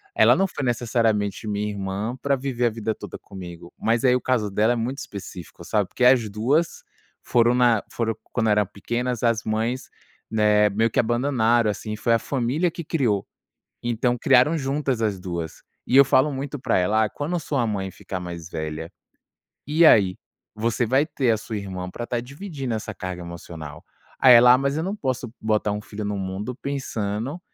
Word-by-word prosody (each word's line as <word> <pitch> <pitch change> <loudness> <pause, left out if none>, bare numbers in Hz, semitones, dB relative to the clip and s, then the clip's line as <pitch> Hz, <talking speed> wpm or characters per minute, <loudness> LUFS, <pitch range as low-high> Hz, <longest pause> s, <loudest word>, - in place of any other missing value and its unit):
Ela - - +6
não 195 - +2
foi 140 - -6
necessariamente 115 -4 0
minha 105 0 -1
irmã 100 +3 -3
para 140 -1 +2
viver 130 -2 -2
a - - +2
vida 110 0 -3
toda - - -8
comigo, 90 -3 -10
mas 115 +2 +1
aí 125 - +5
o 125 - 0
caso 115 -5 0
dela 110 +4 +2
é - - -2
muito 125 +4 -3
específico, 90 -4 -9
sabe. 105 -4 0
Porque 125 - -3
as 125 -3 +5
2 130 +11 0 0.4
foram 120 0 +3
na 120 -4 +3
foram 115 -2 -1 0.2
quando 110 -3 +1
eram 105 0 +3
pequenas, 120 +4 -3
as 115 -1 +2
mães, 115 +4 -2 0.4
né, 105 -1 +3
meio 110 +3 +1
que - - +1
abandonaram, 120 -2 +2
assim, 105 +1 -5
foi 115 +2 +1
a 115 - +3
família 140 +8 0
que 170 - -7
criou, 125 - 0 0.6
então 120 +1 0
criaram 135 +6 +4
juntas 135 -3 -1
as 100 -4 0
2. 85 -3 -5 0.3
E 130 - +4
eu 140 - +9
falo 135 +3 +3
muito 140 +2 -4
para - - +1
ela: 105 +5 +2
"Ah, 105 - 0
quando 150 +5 -3
a - - 0
sua 140 -5 -1
mãe 95 -3 -3
ficar 95 - -6
mais 85 -2 -7
velha, 80 0 -5 0.8
e 160 +3 +5
aí? 95 -10 +5 0.4
Você 115 +2 0
vai 135 +6 +2
ter 135 -6 0
a 110 - +3
sua 110 0 -6
irmã 95 -2 -5
para 120 - -7
estar 120 0 -2
dividindo 140 - -5
essa 110 - -4
carga 95 -2 -6
emocional." 85 -3 -9 0.4
Aí 125 -2 +8
ela 125 +1 +8
"Ah, - - +3
mas 140 +2 0
eu 160 - -1
não 195 +4 -3
posso 130 - -3
botar 105 -1 +1
um 105 - -3
filho 105 0 -7
no 105 0 -2
mundo 95 +6 -4
pensando 130 - -3
115 Hz, 190 wpm, -24 LUFS, 105-130 Hz, 0.8 s, eu